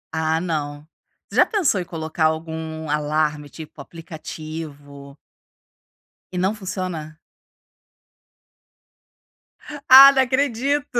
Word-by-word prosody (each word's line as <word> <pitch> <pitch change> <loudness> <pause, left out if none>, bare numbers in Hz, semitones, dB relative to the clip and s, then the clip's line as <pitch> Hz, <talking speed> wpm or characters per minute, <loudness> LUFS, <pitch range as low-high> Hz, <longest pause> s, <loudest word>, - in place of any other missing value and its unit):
Ah, 160 0 0
não. 150 -3 -4 0.4
Já - - +5
pensou 335 - 0
em - - -4
colocar 160 -1 -3
algum 160 0 -3
alarme, 150 0 -1
tipo, 155 -2 -11
aplicativo? 155 -3 -10 1.2
E - - -4
não 190 +4 0
funciona? 185 -6 -6 2.7
Ah, 270 +1 +10
não 270 -1 +2
acredito. 270 +1 -1
160 Hz, 85 wpm, -21 LUFS, 155-190 Hz, 2.7 s, Ah